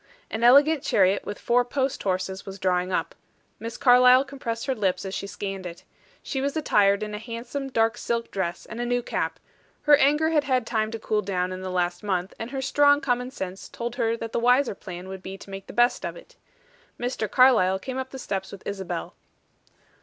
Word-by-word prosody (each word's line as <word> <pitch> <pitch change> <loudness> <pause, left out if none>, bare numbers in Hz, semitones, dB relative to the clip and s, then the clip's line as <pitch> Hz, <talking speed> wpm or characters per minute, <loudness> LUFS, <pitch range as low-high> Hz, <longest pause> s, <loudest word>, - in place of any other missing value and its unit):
An 220 +1 -3
elegant 280 +5 +6
chariot 195 -4 +2
with 205 - -5
four 245 +1 +2
post 265 +2 -2
horses 190 0 -2
was 195 0 -8
drawing 185 -1 0
up. - - -1 0.5
Miss 230 0 -6
Carlyle 250 +1 +6
compressed 235 -5 -5
her 270 - 0
lips 195 -5 -1
as 190 - -5
she 200 - -4
scanned 195 -2 -5
it. 170 0 -10 0.4
She 265 - -3
was 280 +3 -1
attired 200 -8 +3
in 210 0 -5
a 210 - -4
handsome 240 +5 -5
dark 225 -2 +1
silk 235 0 -2
dress 175 -3 -3
and 225 +2 -6
a - - -1
new 245 0 0
cap; - - -2 0.4
her 295 -1 +7
anger 300 +3 +3
had 300 -3 +3
had 255 -4 +1
time 220 -1 0
to 225 - -5
cool 215 -1 -1
down 185 -2 -2
in 185 0 -6
the 185 - -4
last 175 -1 -1
month, 190 -2 -2
and 225 - -5
her 270 0 -4
strong 285 +1 +4
common 250 -3 -1
sense 190 -7 -7
told 240 +1 -5
her 230 -2 +1
that 230 -1 -6
the - - 0
wiser 250 +2 +3
plan 180 -1 -9
would 190 0 -7
be 190 +1 -7
to 195 - -13
make 195 0 -8
the - - -8
best 240 +1 +2
of - - -4
it. - - -16 0.6
Mr. 245 -3 -2
Carlyle 235 -8 +5
came 260 +6 -5
up 260 0 -4
the 265 - -8
steps 195 -6 -4
with 200 - -10
Isabel. 190 - -4
225 Hz, 215 wpm, -25 LUFS, 190-255 Hz, 0.6 s, her